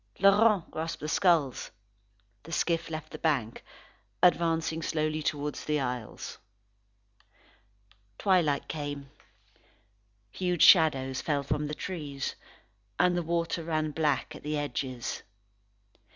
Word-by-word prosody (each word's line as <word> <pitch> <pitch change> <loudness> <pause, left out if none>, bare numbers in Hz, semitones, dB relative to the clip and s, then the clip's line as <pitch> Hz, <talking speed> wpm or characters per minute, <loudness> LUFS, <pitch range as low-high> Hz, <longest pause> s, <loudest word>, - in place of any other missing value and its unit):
Laurent 200 -1 +4
grasped 160 +1 -4
the 150 - -3
skulls. 160 -6 +2 0.7
The 165 - -12
skiff 170 0 0
left 155 0 -6
the - - -8
bank, 135 -9 0 0.6
advancing 165 -2 +3
slowly 155 0 -1
towards 150 -1 -2
the 150 0 0
isles. 125 -4 -5 1.8
Twilight 175 -7 +2
came. 145 -2 -5 1.2
Huge 180 -3 +1
shadows 135 -7 +5
fell 145 -2 0
from 150 +2 -1
the 150 - -4
trees, 145 -5 -4 0.6
and 180 -1 +3
the 175 - +1
water 170 0 -1
ran 155 -1 -1
black 150 -3 0
at - - -10
the 150 +1 -2
edges. 130 -3 -3
155 Hz, 110 wpm, -29 LUFS, 145-170 Hz, 1.8 s, shadows